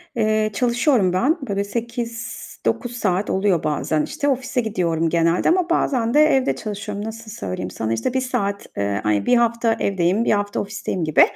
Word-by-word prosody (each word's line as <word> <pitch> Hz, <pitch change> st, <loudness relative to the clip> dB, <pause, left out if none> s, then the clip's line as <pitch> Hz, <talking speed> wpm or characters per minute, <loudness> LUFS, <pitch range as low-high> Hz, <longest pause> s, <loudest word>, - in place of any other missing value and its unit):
Eee, 215 Hz, -1 st, +2 dB
çalışıyorum 240 Hz, -, +2 dB
ben. 270 Hz, -, +2 dB
Böyle, 200 Hz, -, -1 dB
bir 200 Hz, -, 0 dB
8-9 235 Hz, +2 st, -4 dB
saat 200 Hz, -4 st, 0 dB
oluyor 190 Hz, -4 st, +1 dB
bazen, 155 Hz, 0 st, 0 dB
işte, 285 Hz, -, -3 dB
ofise 255 Hz, -1 st, 0 dB
gidiyorum 170 Hz, -7 st, 0 dB
genelde 170 Hz, +1 st, +2 dB
ama 355 Hz, 0 st, +2 dB
bazen 245 Hz, -8 st, +1 dB
de 305 Hz, +1 st, +6 dB
evde 270 Hz, -3 st, +2 dB
çalışıyorum. 205 Hz, -1 st, -5 dB
Nasıl 225 Hz, 0 st, -7 dB
söyleyeyim 90 Hz, -, -5 dB
sana, 110 Hz, 0 st, -2 dB
işte, 115 Hz, -, -1 dB
1 260 Hz, -, +1 dB
saat, 200 Hz, -6 st, -2 dB
eee, 100 Hz, 0 st, -1 dB
ay 105 Hz, -1 st, +1 dB
1 245 Hz, -, +4 dB
hafta 235 Hz, -1 st, +2 dB
evdeyim, 195 Hz, +2 st, +1 dB
1 -, -, +2 dB
hafta 205 Hz, -1 st, 0 dB
ofisteyim 200 Hz, -3 st, -4 dB
gibi. 155 Hz, -1 st, +4 dB
210 Hz, 175 wpm, -21 LUFS, 180-240 Hz, -, de